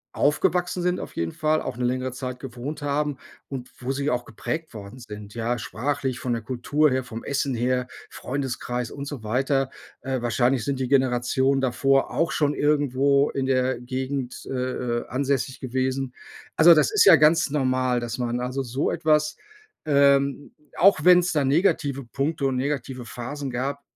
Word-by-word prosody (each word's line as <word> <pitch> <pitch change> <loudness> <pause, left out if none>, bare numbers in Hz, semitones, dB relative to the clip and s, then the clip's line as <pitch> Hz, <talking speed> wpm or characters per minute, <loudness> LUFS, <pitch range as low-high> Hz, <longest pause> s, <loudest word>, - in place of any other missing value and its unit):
aufgewachsen 180 +4 +1
sind 180 0 +1
auf - - -8
jeden 85 0 -2
Fall, 155 0 +1
auch 125 - -5
'ne 125 - -1
längere 130 +1 -1
Zeit 125 0 -6
gewohnt 135 +4 -6
haben 145 -1 -1 0.3
und 130 -3 -6
wo 130 +1 -3
sie 140 +2 -1
auch 125 0 -1
geprägt 160 -4 -5
worden 105 +5 -9
sind, 105 -3 -10
ja? 120 +1 -1
Sprachlich, 135 +3 -3
von 125 -5 -2
der 115 -2 -3
Kultur 135 +5 +1
her, 130 0 0
vom 115 -2 -8
Essen 140 -2 -1
her, 125 +1 0 0.2
Freundeskreis 125 -2 -4
und 140 0 -6
so 140 -6 -7
weiter. 135 +4 0 0.3
Äh, 130 -2 -2
wahrscheinlich 120 +1 +1
sind 135 -2 -2
die 130 - -1
Generationen 130 +1 +2
davor 135 +1 +2
auch 165 - 0
schon 145 -1 +1
irgendwo 140 -1 +2
in 135 -1 -2
der 130 -2 +1
Gegend, 130 0 -4
äh, - - -7 0.5
äh, - - -9
ansässig 135 -1 -1
gewesen. 130 0 -2 0.4
Also, 170 +1 +8
das 155 - +3
ist 425 - +4
ja - - +10
ganz 155 +1 +4
normal, 130 -3 +1
dass 120 +1 -5
man 120 0 -1
also, 130 +2 -2
so 130 +4 -1
etwas, 150 -1 +1 0.5
ähm, 140 -1 +3 0.2
auch 195 -1 +5
wenn's 180 0 +6
da 150 -2 +2
negative 140 -3 +1
Punkte 140 +3 -2
und 130 -1 0
negative 135 -2 -3
Phasen 135 +4 -6
gab, 135 +3 -3
135 Hz, 170 wpm, -24 LUFS, 125-145 Hz, 0.5 s, ja